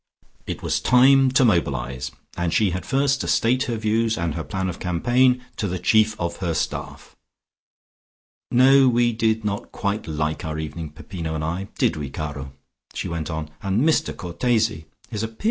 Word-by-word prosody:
It - - -5
was - - 0
time 135 +2 +5
to 130 -1 +5
mobilise, 65 - 0 0.3
and 85 -1 -1
she 100 +1 +2
had 90 +1 -4
first 140 0 +1
to - - -3
state 125 +3 +2
her 120 -2 -2
views 110 +1 +1
and 85 -2 -1
her 80 +1 -4
plan 95 +2 -3
of 90 -1 -5
campaign 125 +8 +2
to 105 - -1
the 90 0 -2
chief 110 +4 +2
of 85 0 -2
her 85 -4 -2
staff. 75 - -4 1.3
"No, 130 +2 +6
we 120 -1 +2
did 110 -1 0
not 100 -1 -3
quite 100 -1 -2
like 75 0 -2
our 80 -2 -4
evening, 80 +1 -5
Peppino 80 +1 -6
and 80 - -3
I, 85 +5 -3
did - - +1
we, 75 -2 -4
caro?" 70 -2 -5 0.4
she - - -3
went 85 -2 -4
on. 80 -1 -4
"And 100 +9 +1
Mr 160 - +1
Cortese! 105 -2 0 0.2
His 105 - -3
appearance! 110 0 -6
95 Hz, 180 wpm, -23 LUFS, 80-115 Hz, 1.3 s, No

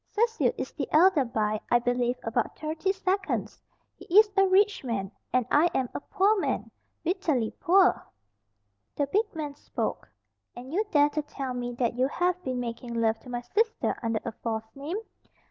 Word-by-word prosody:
Cecil 455 +1 +1
is - - -4
the - - -4
elder 325 -1 +5
by, 215 -3 -1
I 240 - +5
believe, 245 +1 0
about 225 - -1
thirty 315 +5 -1
seconds. 385 0 -2 0.4
He - - -13
is 425 -1 +7
a 390 -1 +5
rich 395 0 +3
man, 205 -6 -3 0.2
and 255 -1 +2
I 320 +4 +5
am 255 -2 0
a - - -3
poor 410 +6 +2
man - - -2 0.3
bitterly 320 - 0
poor." 370 +2 +4 0.9
The 285 - +1
big 410 +11 0
man 300 -3 -4
spoke. 285 - -4 0.5
"And 255 +4 -9
you 410 +5 +2
dare 290 -5 +4
to 305 +1 -2
tell 275 -3 -5
me 245 0 -4
that 235 -1 0
you 260 - +4
have 360 +4 -1
been 255 -1 -2
making 235 0 -5
love 225 -1 +1
to 250 - -14
my 240 -1 -3
sister 440 - 0
under 225 -2 0
a 230 - -2
false 220 0 -4
name? 290 +7 -4
280 Hz, 180 wpm, -27 LUFS, 240-375 Hz, 0.9 s, is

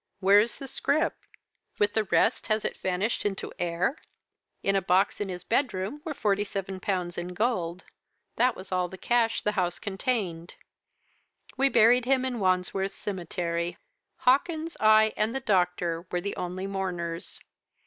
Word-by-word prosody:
Where 200 +1 +6
is 230 +3 0
the 275 - -7
scrip? 310 +4 0 0.6
With 205 0 +2
the 220 -1 +1
rest, 225 - +2
has 215 -1 +1
it - - -2
vanished 190 +5 -1
into 200 -2 -3
air? 175 - 0 0.6
In 195 - +2
a 195 - +3
box 185 +3 +2
in 200 - -2
his 180 -1 -5
bedroom 235 +1 -1
were 310 -3 -4
forty 205 -5 +1
seven 195 -1 -5
pounds 180 -3 -2
in 180 +1 -6
gold. 180 -6 -1 0.5
That 250 -1 +3
was 190 - -10
all 180 -1 +1
the 190 - -10
cash 235 +2 +1
the 210 - +2
house 180 -4 -1
contained. 190 -5 -3 1.0
We 275 +1 +3
buried 240 +1 +5
him 260 0 +2
in 250 -2 -2
Wandsworth 185 +1 +1
Cemetery; 175 -3 -3 0.4
Hawkins, 315 +5 +1
I, 215 0 +5
and 220 +4 0
the - - 0
doctor 180 -6 0
were 180 - -1
the 200 +2 -3
only 180 +1 -4
mourners. 180 -4 -4
195 Hz, 160 wpm, -27 LUFS, 180-230 Hz, 1.0 s, Where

